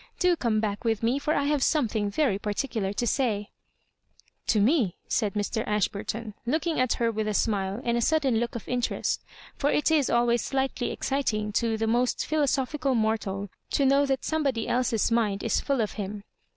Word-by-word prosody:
Do 360 -1 +3
come 230 -8 0
back 205 -2 -2
with 225 -2 0
me, 245 +5 +2
for 300 +2 0
I 285 - +1
have 290 0 +1
something 220 -8 +1
very 210 -3 +1
particular 210 -1 -2
to 225 +4 -2
say—" 220 -5 0 0.4
*'* - - -36
To 215 - +3
me 225 - +3
?" - - -44
said 210 -2 0
Mr. 210 +2 -1
Ashburton, 210 +1 -2
looking 315 +5 0
at 255 -2 +2
her 230 -1 0
with 215 -1 -2
a 210 - -1
smile 200 -1 0
and 235 0 +1
a 235 - +1
sudden 275 -4 +2
look 235 0 -2
of 235 - -6
interest; 250 -1 -1 0.3
for 285 - 0
it 300 +2 +2
is 300 -4 +3
always 235 0 +3
slightly 265 -2 -1
exciting 215 -6 -1
to 225 +1 0
the 225 - 0
most 240 +3 +1
philo 305 -1 +1
sophical 275 0 0
mortal 205 -3 -1 0.2
to 280 - +3
kndVv 280 +1 +4
that 270 -1 -1
somebody 280 -7 0
else's 240 -3 +1
mind 210 -4 +1
is' - - +1
full 275 -4 0
of 215 - -1
him. 205 0 -5
235 Hz, 195 wpm, -27 LUFS, 210-275 Hz, 0.4 s, kndVv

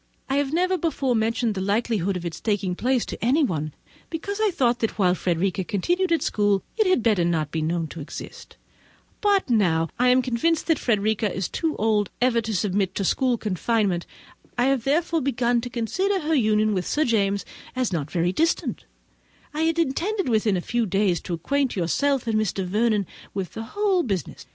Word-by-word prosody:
I 275 - +2
have 285 -1 0
never 365 +3 +1
before 275 -6 0
mentioned 225 +1 +1
the 190 - -3
likelihood 200 -2 0
of 175 - -7
its 170 - -5
taking 200 -4 0
place 250 +5 0
to - - -7
anyone, 225 - +1 0.4
because 400 +6 -4
I 435 - +4
thought 245 -9 +1
that 225 - -2
whilst 180 -3 +2
Frederica 185 +2 0
continued 350 - 0
at 330 - +2
school 205 -2 +1
it 435 -3 +2
had 370 -11 +3
better 210 -6 +3
not 160 -4 0
be 160 - -2
known 165 +1 -1
to 170 - -8
exist; 145 - -9 0.6
but 405 -2 +3
now, 185 -10 +3
as 165 - -4
I 250 - +4
am 255 +1 +5
convinced 305 +7 0
that 325 -3 +2
Frederica 215 -2 +1
is 190 0 -2
too 320 -2 -2
old 210 -2 +1
ever 245 -1 +3
to 220 -1 -3
submit 195 0 0
to 195 - -1
school 250 +4 +2
confinement, 205 -3 0 0.5
and 245 +2 +3
have, 260 -4 -1
therefore, 325 +3 +1
begun 245 -3 +1
to 245 - -5
consider 370 - -1
her 315 +1 -1
union 215 -5 +3
with 185 -2 -2
Sir 310 +1 +1
James 200 -4 +1 0.3
as 255 -6 0
not 150 -4 -2
very 175 +1 0
distant, 325 +7 0 0.7
I 305 - -2
had 330 0 +1
intended 335 +4 0
within 215 -3 +2
a - - -2
few 235 +3 -1
days 195 -2 +1
to 175 - -3
acquaint 275 - -1
yourself 260 - +1
and 225 -2 0
Mr. 195 -3 -1
Vernon 210 +2 +1 0.3
with 190 -3 -3
the 225 - -5
whole 400 -3 +3
business. 195 - -4
225 Hz, 195 wpm, -24 LUFS, 195-280 Hz, 0.7 s, am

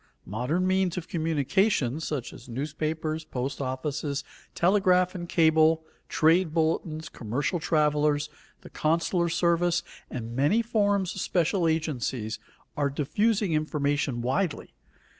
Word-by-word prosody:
Modern 125 - -1
means 185 -1 +1
of 170 - -4
communication 155 - +1
such 150 -6 -4
as 125 - -13
newspapers, 155 +4 -3
post 135 0 -4
offices, 140 +2 -2 0.3
telegraph 185 0 +3
and 175 -2 -6
cable, 160 -1 +4 0.3
trade 165 +1 +3
bulletins, 160 -1 0
commercial 135 - -2
travelers, 150 -1 +2 0.3
the - - -13
consular 170 +2 +1
service, 170 0 +2 0.3
and 115 -1 -6
many 150 - +3
forms 205 -4 +1
of 190 - -5
special 175 0 +1
agencies, 130 -8 -2 0.4
are 145 -1 +1
diffusing 195 +8 +1
information 145 -4 0
widely. 155 +7 -1
160 Hz, 115 wpm, -27 LUFS, 140-175 Hz, 0.4 s, cable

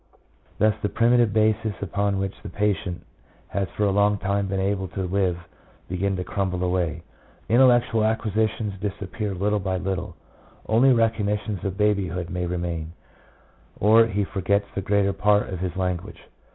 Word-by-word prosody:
1 110 +1 +4
Thus - - -7
the 105 - 0
primitive 120 -1 +3
bases 110 0 +1
upon 100 +1 -1
which 95 0 -2
the - - -7
patient 100 -3 -2 0.4
has 100 0 -1
for 105 - +1
a 100 - +3
long 100 +1 +3
time 100 0 -1
been 95 0 -2
able 95 0 -1
to 95 - -4
live 90 -1 0 0.5
begin 95 +2 -1
to 90 - -3
crumble 90 -1 -2
away. 90 -2 -1 0.4
Intellectual 120 -2 +4
acquisitions 110 -1 0
disappear 100 0 -4
little 105 +3 0
by 95 -1 -2
little. 95 0 -3 0.5
Only 120 +5 +5
recollections 105 -4 0
of 95 -1 -3
baby 105 -2 +2
hood 85 +1 -5
may 90 -1 -2
remain, 85 -2 -3 0.9
or 110 +2 +6
he 105 -2 -1
forgets 100 +1 0
the 100 - -2
greater 100 0 +1
part 105 +1 +2
of 95 - -4
his 90 -1 -3
language. 90 -2 -3
100 Hz, 160 wpm, -24 LUFS, 95-105 Hz, 0.9 s, or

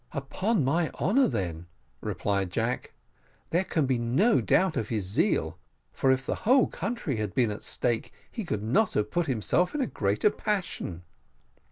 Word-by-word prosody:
"Upon 155 - 0
my 160 +4 +1
honour, 255 +7 +3
then," 85 - -3 0.3
replied 100 -2 -1
Jack, 115 +6 -2 0.6
"there 175 +3 +2
can 160 -5 0
be 130 -2 +1
no 140 - +3
doubt 185 -3 +3
of 110 - -2
his 110 -5 -1
zeal; 95 - +1 0.3
for 135 - +2
if 130 0 0
the - - -2
whole 255 +3 +5
country 185 - -3
had 105 -3 -3
been 120 -4 +2
at 105 - -6
stake, 120 -2 -1 0.2
he 225 - -4
could 105 - -3
not 195 - +2
have 105 0 0
put 175 -2 0
himself 140 - +1
in 295 - 0
a - - +2
greater 105 - +1
passion." 180 - -3
130 Hz, 170 wpm, -28 LUFS, -, 0.6 s, whole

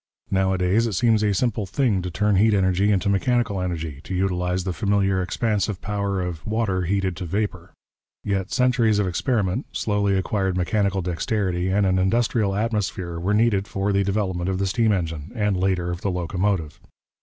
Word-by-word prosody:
Nowadays 95 +3 +2
it 110 - -3
seems 110 +2 +3
a 105 -1 +2
simple 105 0 0
thing 105 -2 +1
to 90 - -4
turn 100 +3 +1
heat 110 +2 +4
energy 95 +1 +2
into 100 0 +1
mechanical 105 0 +1
energy, 80 -5 -4
to 95 - -4
utilize 90 -1 0
the 95 -1 -2
familiar 100 -2 +1
expansive 105 +1 -1
power 100 -2 -2
of 85 -3 -5
water 105 -4 -1
heated 95 0 0
to 90 - -5
vapour. 100 +5 -3 0.5
Yet 100 -1 -2
centuries 125 -4 +2
of 105 - +2
experiment, 105 - -1
slowly 100 -2 +1
acquired 95 0 -1
mechanical 95 +1 0
dexterity, 90 0 -1
and 100 +2 +2
an 95 -1 +2
industrial 105 +1 +1
atmosphere 100 -6 -2
were 95 +5 0
needed 105 -3 +2
for 100 +1 -1
the 100 0 +2
development 95 -3 -1
of 95 - -1
the 100 - 0
steam 110 +3 +2
engine, 80 -6 -3
and 105 -3 +1
later 90 -1 0
of 90 +1 -5
the 100 - -1
locomotive. 90 -2 -1
95 Hz, 175 wpm, -23 LUFS, 90-105 Hz, 0.5 s, heat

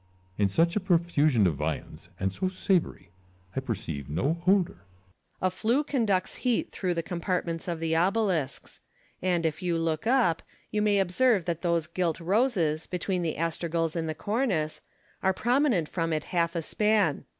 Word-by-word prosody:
Ccesar. 95 +1 -13
In 100 - +4
such 170 - +2
a - - +3
profusion 165 - +3
of 90 - +3
viands, 75 +1 -4
and 95 0 -1
so 185 - -1
savoury, 185 - -1 0.4
I - - +1
perceive 90 - -4
no 140 - 0
odour. 190 -1 +3
Luculhis. 90 - -23
A 185 - +3
flue 230 +9 +1
conducts 225 -10 0
heat 245 -3 0
through 180 -2 -2
the 165 - -1
compart 180 +1 -2
ments 165 0 -4
of 170 -2 -2
the 165 0 0
obelisks; 180 -4 0 0.4
and, 175 -2 +1
if 160 +3 -1
you 175 -2 0
look 165 +4 -1
up, 240 -10 +3 0.3
you 210 - 0
may 210 -1 +3
observe 195 +1 +3
that 170 -2 -2
those 170 -2 +1
gilt 170 -1 -1
roses, 175 - +1
between 180 +1 -2
the 165 -2 -1
astragals 165 0 -1
in 165 -1 -1
the 155 - -3
cornice, 200 - -1 0.4
are 190 0 +2
prominent 240 - +2
from 165 -1 -2
it 155 - -1
half 170 -1 0
a 165 - -1
span. 210 +4 +1
170 Hz, 175 wpm, -28 LUFS, 155-195 Hz, 0.4 s, In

